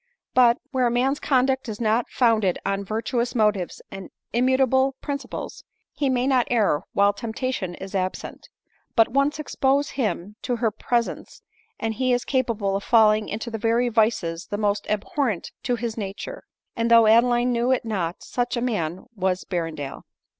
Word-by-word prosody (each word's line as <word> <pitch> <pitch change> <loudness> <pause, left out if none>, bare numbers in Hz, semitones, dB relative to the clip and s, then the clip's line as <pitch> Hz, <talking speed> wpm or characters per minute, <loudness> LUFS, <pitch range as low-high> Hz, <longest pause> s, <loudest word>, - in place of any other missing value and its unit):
But, 245 -1 +5
where 255 -2 +2
a - - +2
man's 260 +4 +1
conduct 265 -2 +1
is 215 - -5
not 225 +1 +1
founded 220 -7 +2
on 195 0 -1
virtuous 235 +4 -2
motives 210 -5 0
and 195 -1 -8 0.2
immutable 260 +2 +3
principles, 280 -1 -6 0.3
he 280 -2 0
may 250 -1 +1
not 260 -3 +2
err 210 -11 +2
while 200 0 +4
temptation 220 -3 -3
is 190 +1 -9
absent; 185 -1 -4 0.5
but 225 -2 +5
once 275 +3 +1
expose 280 -2 0
him 210 -5 -3
to 245 - -1
her 225 -2 0
pres 235 +3 0
ence, - - -10 0.4
and 225 -1 -1
he 255 +2 +1
is 245 - 0
capable 230 -7 0
of 200 - -2
felling 215 -2 +4
into 225 +3 -4
the 225 - -4
very 230 +2 +2
vices 215 -7 0
the 205 - -3
most 205 -1 0
abhorrent 215 - -1
to 245 - 0
his 235 -1 -4
nature; 205 - -6 0.3
and 230 0 0
though 230 -1 +7
Adeline 240 +2 +4
knew 240 +1 +1
it 260 - +1
not, 185 -6 -3
such 245 0 -2
a - - +1
man 185 -8 -2
was 185 -2 0
Berrendale. 165 -6 -4
230 Hz, 170 wpm, -24 LUFS, 205-250 Hz, 0.5 s, though